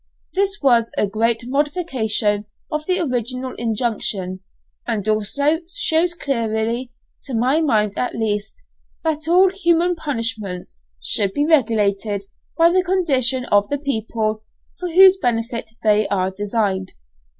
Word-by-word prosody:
This 395 +1 0
was 235 -4 +3
a - - +3
great 225 +3 0
modification 250 - 0 0.3
of 305 0 -2
the 370 0 +1
original 255 -3 -2
injunction, 215 -5 -2 0.5
and 220 -3 -2
also 280 +9 +1
shows 340 +1 +2
clearly, 235 -3 -2 0.3
to 265 - -5
my 260 +7 +2
mind 215 -9 +1
at 250 - -2
least, 215 - -3 0.4
that 315 -1 -1
all 365 +2 +5
human 350 -2 +1
punishments 225 - -4 0.2
should 195 - +1
be 290 - +1
regulated 215 -8 +1 0.3
by 335 0 +5
the 370 +1 +3
condition 270 -9 +2
of 205 0 +3
the 285 - -1
people 220 -5 -2 0.4
for 360 - -3
whose 380 +2 +7
benefit 230 -6 -2
they 210 -1 +3
are 190 -1 0
designed. 200 -1 -2
235 Hz, 130 wpm, -20 LUFS, 215-310 Hz, 0.5 s, whose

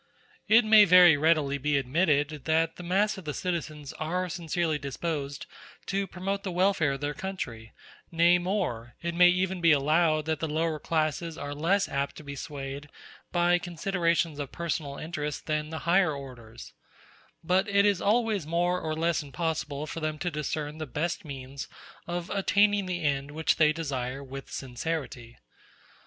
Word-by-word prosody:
It 220 +1 +6
may 215 -1 +8
very 180 -3 +8
readily 145 -2 +2
be 145 +1 +1
admitted 145 +1 +1
that 165 +1 +1
the - - -7
mass 195 +4 +1
of 185 - -13
the 150 - -4
citizens 155 -5 -4
are 180 +4 -2
sincerely 165 -2 -1
disposed 140 0 -4 0.4
to 195 0 -1
promote 195 +2 -3
the 195 - -4
welfare 180 -5 +2
of 135 - -6
their 145 0 -2
country; 125 -12 -6 0.4
nay 170 +1 +4
more, 175 - -2
it 170 0 -2
may 175 +1 +7
even 185 0 0
be 165 -1 +5
allowed 155 +2 +3
that 160 -2 -1
the 160 - -2
lower 155 0 -1
classes 160 +1 -1
are 145 0 -5
less 180 +7 +1
apt 140 0 -2
to - - -10
be 140 -1 -7
swayed 140 0 -6 0.4
by 175 0 +3
considerations 170 -3 -1
of 140 -2 -5
personal 155 -4 -3
interest 150 -2 -4
than 150 -1 -1
the 160 - -5
higher 175 -2 +3
orders: 120 -5 -10 0.7
but 185 +5 +2
it 200 0 +4
is 200 -3 +2
always 215 -5 +1
more 175 +2 +1
or 155 -1 -2
less 165 0 +1
impossible 150 0 -3
for 160 - -6
them 155 -1 -2
to 175 +4 -2
discern 150 0 -4
the 155 - -4
best 165 +9 -2
means 135 -2 -7 0.4
of 175 0 -4
attaining 200 0 +2
the 175 -2 -3
end 140 -1 0
which 155 +2 0
they 155 -1 +5
desire 140 -4 -4
with 135 0 -9
sincerity. 125 -3 -5
160 Hz, 165 wpm, -28 LUFS, 145-175 Hz, 0.7 s, may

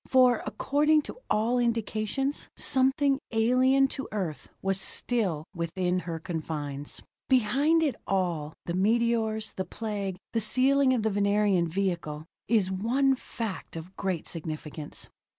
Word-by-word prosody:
For, 255 -3 +5
according 300 +2 +2
to - - -7
all 230 +4 +2
indications, 235 +3 -1
something 270 +1 +3
alien 255 +4 +4
to 270 - -5
Earth 180 -9 -4
was 195 0 0
still 190 -13 0
within 180 +1 -1
her 165 - -2
confines. 150 -4 -5 0.3
Behind 275 +7 +3
it 290 -5 +1
all 170 -6 -1
the 170 - -2
meteors, 220 +2 +1
the 190 - -3
Plague, 200 -1 -4 0.2
the 230 - +2
sealing 260 +5 +4
of 225 - -1
the 220 - +1
Venerian 200 -3 +2
vehicle 170 -4 -2 0.2
is 205 -4 +2
one 245 +8 +2
fact 225 -8 -6
of 165 +4 -8
great 185 -4 -2
significance. 155 -2 -5
210 Hz, 130 wpm, -28 LUFS, 180-255 Hz, 0.3 s, For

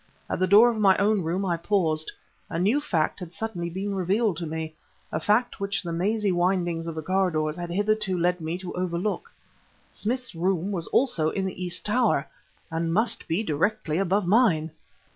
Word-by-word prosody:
At - - -1
the 185 - +2
door 210 +6 +8
of 230 -2 0
my 195 -2 +5
own 205 0 +2
room 175 +4 -1
I 175 -2 0
paused; 165 -4 0 0.4
a 165 - -3
new 210 +12 +2
fact 165 - 0
had 180 -3 -8
suddenly 180 -4 -3
been 195 +4 -3
revealed 195 +1 +1
to 170 - -3
me, 160 0 -4 0.4
a 155 - -1
fact 215 +9 +1
which 200 0 -1
the 170 -1 -4
mazy 205 +4 +1
windings 175 -2 0
of 165 - -4
the 160 - -4
corridors 165 -4 0
had 175 0 -5
hitherto 205 0 0
led 180 0 +1
me 160 +2 -3
to 185 -1 -7
overlook. 185 - -2 0.6
Smith's 250 +3 -2
room 180 +2 0
was 170 -4 -1
also 205 - +2
in 190 +3 -2
the 185 -1 -4
east 175 -1 -1
tower, 210 - +2 0.5
and 165 0 -1
must 220 +7 +1
be 175 +6 0
directly 165 0 0
above 195 +1 +1
mine! 175 -6 +3
185 Hz, 185 wpm, -26 LUFS, 165-205 Hz, 0.6 s, door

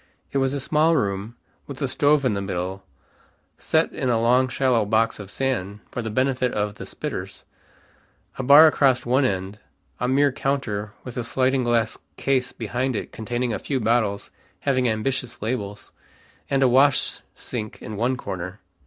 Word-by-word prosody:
It 140 - +1
was 135 +1 +1
a - - -1
small 155 +4 +2
room, 100 -2 -1 0.3
with - - -8
a - - 0
stove 145 -1 +2
in 125 - +2
the 100 - -2
middle, 95 0 -4 0.8
set - - +1
in 130 - -1
a 115 -2 +2
long 125 +3 +3
shallow 125 -3 +2
box 110 +2 +1
of 100 -2 -8
sand, 105 -6 -2
for 125 - -3
the 110 - -4
benefit 130 +2 +1
of 105 0 -1
the - - -9
"spitters," - - -6 0.9
a - - -3
bar 140 +4 +9
across 135 -5 +3
one 130 +3 +3
end 95 -1 -2 0.4
a 125 - 0
mere 140 +2 +3
counter 120 -7 -2
with 125 -1 -8
a 125 - -1
sliding 130 +2 +1
glass 115 -2 +1 0.2
case 130 -2 0
behind 125 +3 -2
it - - -4
containing 120 +1 -2
a - - -2
few 135 -3 -2
bottles 110 -3 0 0.3
having 130 -3 +2
ambitious 120 +2 -2
labels, 105 -3 -4 0.6
and 135 -1 +2
a - - +6
wash 135 +3 +3 0.2
sink 110 -4 -6
in 110 - -7
one 120 +5 0
corner. 90 -3 -6
120 Hz, 170 wpm, -23 LUFS, 105-135 Hz, 0.9 s, bar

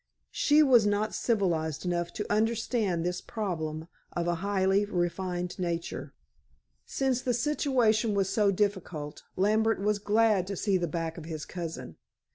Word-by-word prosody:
She 300 +1 +4
was 245 -7 +5
not 205 +1 0
civilized 170 - 0
enough 175 -1 -1
to 210 - -3
understand 215 -4 0
this 180 +1 -2
problem 160 -7 -4 0.3
of 175 0 -1
a 175 - +2
highly 195 0 +2
refined 180 -1 -2
nature. 170 -5 -3 0.7
Since 265 -2 0
the 245 -2 0
situation 240 -5 +2
was 195 -2 +2
so 205 +1 +2
difficult, 185 -7 -2
Lambert 215 +3 +2
was 205 +1 +1
glad 210 -2 +2
to 200 - -3
see 195 0 +1
the 175 -1 -1
back 165 +1 -3
of 160 - -10
his 160 -2 -5
cousin. 165 - -6
195 Hz, 145 wpm, -29 LUFS, 175-215 Hz, 0.7 s, was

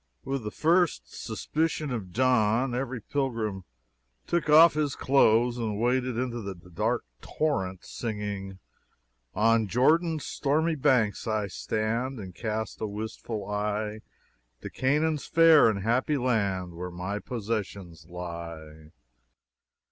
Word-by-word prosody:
With 135 -2 -3
the 105 - -3
first 160 - +1
suspicion 155 -2 -2
of 105 -7 -4
dawn, 125 +1 +2
every 125 0 -3
pilgrim 110 -7 -2 0.6
took 170 -3 -1
off 160 +2 +8
his 150 -2 -1
clothes 120 -2 +3
and 110 -3 -2
waded 125 0 +1
into 120 -1 -2
the 100 -2 -5
dark 105 +8 -2 0.2
torrent, 95 - -2
singing: 105 -4 -5 0.8
"On 115 +1 +3
Jordan's 155 - +2
stormy 155 +4 0
banks 125 -7 +1
I 110 -1 0
stand, 115 +6 -2
And 95 -3 -8
cast 110 +2 -4
a 110 - -1
wistful 110 0 -5
eye 105 +1 -2 0.6
To - - -7
Canaan's 150 +3 0
fair 165 -6 +6
and 100 -3 -2
happy 125 +6 +1
land, 100 -8 0
Where 90 +2 -6
my 90 +4 -4
possessions 100 -8 -5
lie." 85 -3 -8
110 Hz, 120 wpm, -27 LUFS, 100-130 Hz, 0.8 s, off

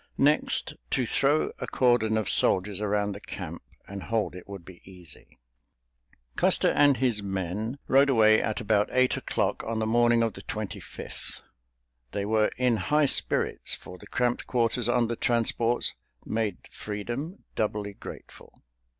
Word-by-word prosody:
Next, 150 +2 +2 0.2
to 125 - 0
throw 140 +6 +1
a - - -4
cordon 120 -4 +2
of 110 -3 -1
soldiers 95 +1 +2
around 105 0 0
the 100 - -7
camp - - -7 0.3
and 100 0 -7
hold 105 -1 -2
it 90 +1 -11
would 100 -4 -8
be 90 -1 -13
easy. 90 -5 -14 1.0
Custer - - +3
and 145 -2 +4
his 120 -4 0
men 100 +5 -3
rode 135 +1 +5
away 110 -4 +5
at 110 - -2
about 105 -2 +1
eight 130 0 +3
o'clock - - -2
on 115 0 -3
the 110 - 0
morning 120 +1 +3
of 115 -2 -1
the - - -10
Twenty - - -5
fifth. - - -10 0.7
They 100 - -2
were 110 0 +2
in 125 -2 +2
high 150 +9 +2
spirits, - - +2
for 90 0 -12
the - - -13
cramped 125 -1 -1
quarters 120 -1 0
on 120 -1 +2
the 115 - -2
transports 115 0 +1 0.3
made 110 -4 -1
freedom 120 - -6
doubly 105 -1 -2
grateful. - - -12
110 Hz, 155 wpm, -27 LUFS, 100-120 Hz, 1.0 s, rode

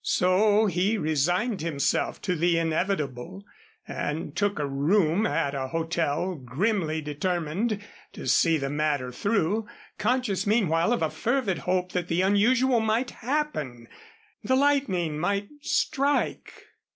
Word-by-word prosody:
So 205 +4 +3
he 195 +3 +1
resigned 175 - 0
himself 150 -4 -1
to 180 -3 0
the 170 +1 +2
inevitable, 165 0 -2 0.4
and 155 +3 -4
took 205 -1 0
a 150 - -1
room 160 +8 +2
at 140 - -1
a 135 -1 -3
hotel, 165 +3 -1
grimly 160 - -1
determined 175 +7 -2 0.3
to - - -8
see 165 -2 +4
the 135 -1 -3
matter 145 -4 -1
through, 205 - 0 0.3
conscious 215 -3 0
meanwhile 185 -4 +2
of 240 - +1
a - - 0
fervid 235 -7 -1
hope 180 0 0
that 180 -1 -2
the 175 +2 +1
unusual 235 +6 +3
might 225 +3 0
happen 215 - -3 0.6
the 260 +5 +2
lightning 260 - +1
might 200 +4 -1
strike. 285 0 0
180 Hz, 125 wpm, -26 LUFS, 155-215 Hz, 0.6 s, see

